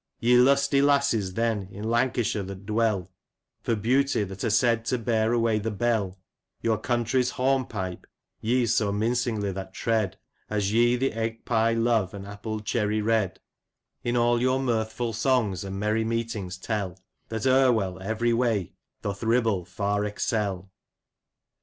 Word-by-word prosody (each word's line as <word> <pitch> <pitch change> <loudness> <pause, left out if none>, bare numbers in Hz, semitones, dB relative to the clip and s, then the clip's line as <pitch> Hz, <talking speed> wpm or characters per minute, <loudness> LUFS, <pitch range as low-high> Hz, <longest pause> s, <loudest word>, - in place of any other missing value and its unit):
" - - -52
Ye 120 +1 +4
lusty 140 +2 +4
lasses, 140 -9 +2
then, 115 -4 0
in 100 +3 -6
Lancashire 120 -2 +1
that 95 0 -8
dwell, 105 -4 0 0.3
'* - - -58
For 115 - +1
beauty 130 +2 +2
that 95 -1 -7
are 115 - +1
said 115 +1 +3
to 125 - 0
bear 115 -1 +1
away 115 -2 +2
the 110 +2 -2
bell, 105 -3 -1 0.2
" - - -53
Your 110 -2 +1
country's 120 +1 +1
hornpipe 125 -9 -1 0.3
ye 120 +2 +1
so 110 -3 +1
mindngly 110 -1 0
that 95 0 -7
tread, 110 -5 0 0.2
" - - -43
As 105 -1 0
ye 120 +1 +4
the 130 0 0
egg 115 0 -3
pye 115 -1 +2
love, 115 -5 +1
and 100 -1 -7
apple 105 +2 -5
cherry 105 -1 0
red, 110 -5 +1 0.3
" - - -54
In 120 0 0
all 120 0 +3
your 130 +1 +2
mirthful 115 -2 -1
songs, 115 -4 +1
and 95 0 -5
merry 105 +2 +1
meetings 110 -5 -3
tell 95 -2 -3 0.2
" - - -47
That 110 0 -3
Erwell 120 -9 +3
every 110 +4 0
way 115 -6 0 0.3
doth 100 -1 -4
Ribble 115 -5 +1
far 100 +3 -1
excel." 100 -2 -2
110 Hz, 165 wpm, -26 LUFS, 100-120 Hz, 0.3 s, Ye